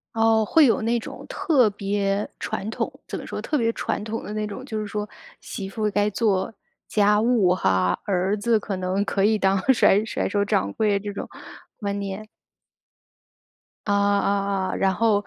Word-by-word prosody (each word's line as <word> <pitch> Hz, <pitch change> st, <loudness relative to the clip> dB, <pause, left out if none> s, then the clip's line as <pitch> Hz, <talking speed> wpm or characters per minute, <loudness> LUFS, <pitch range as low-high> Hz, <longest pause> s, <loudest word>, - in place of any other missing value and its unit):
哦， 225 Hz, -1 st, +4 dB
会 315 Hz, +7 st, +5 dB
有 230 Hz, -, +3 dB
那 235 Hz, +2 st, +1 dB
种 -, -, -9 dB
特 270 Hz, -, +2 dB
别 200 Hz, 0 st, -1 dB
传 195 Hz, -, -4 dB
统， -, -, -2 dB, 0.2 s
怎 -, -, -4 dB
么 -, -, -8 dB
说？ -, -, -5 dB
特 300 Hz, -, -1 dB
别 230 Hz, -2 st, +1 dB
传 -, -, -3 dB
统 220 Hz, +1 st, -4 dB
的 210 Hz, -, -6 dB
那 215 Hz, 0 st, -2 dB
种， 210 Hz, +5 st, -7 dB
就 220 Hz, -5 st, -4 dB
是 210 Hz, -, -4 dB
说 210 Hz, +1 st, -3 dB, 0.3 s
媳 195 Hz, -1 st, -6 dB
妇 215 Hz, +1 st, -1 dB
该 205 Hz, +1 st, +2 dB
做 195 Hz, -3 st, 0 dB, 0.4 s
家 210 Hz, 0 st, +3 dB
务 225 Hz, -6 st, +3 dB
哈， 95 Hz, -, +1 dB
儿 190 Hz, 0 st, +1 dB
子 220 Hz, +1 st, +2 dB
可 200 Hz, -1 st, -4 dB
能 185 Hz, +2 st, 0 dB
可 195 Hz, 0 st, 0 dB
以 215 Hz, +1 st, +4 dB
当 195 Hz, -1 st, +2 dB, 0.2 s
甩 205 Hz, -3 st, +4 dB
甩 210 Hz, -, -2 dB
手 200 Hz, 0 st, +1 dB
掌 100 Hz, -, 0 dB
柜 205 Hz, -2 st, +1 dB
这 205 Hz, 0 st, -5 dB
种 -, -, -5 dB
观 -, -, -15 dB, 0.7 s
念。 200 Hz, +3 st, -6 dB, 1.6 s
啊， 205 Hz, -, +2 dB
啊 200 Hz, -1 st, +1 dB
啊。 -, -, -3 dB
然 190 Hz, -1 st, +2 dB
后， 205 Hz, 0 st, +2 dB
205 Hz, 195 characters per minute, -24 LUFS, 195-220 Hz, 1.6 s, 会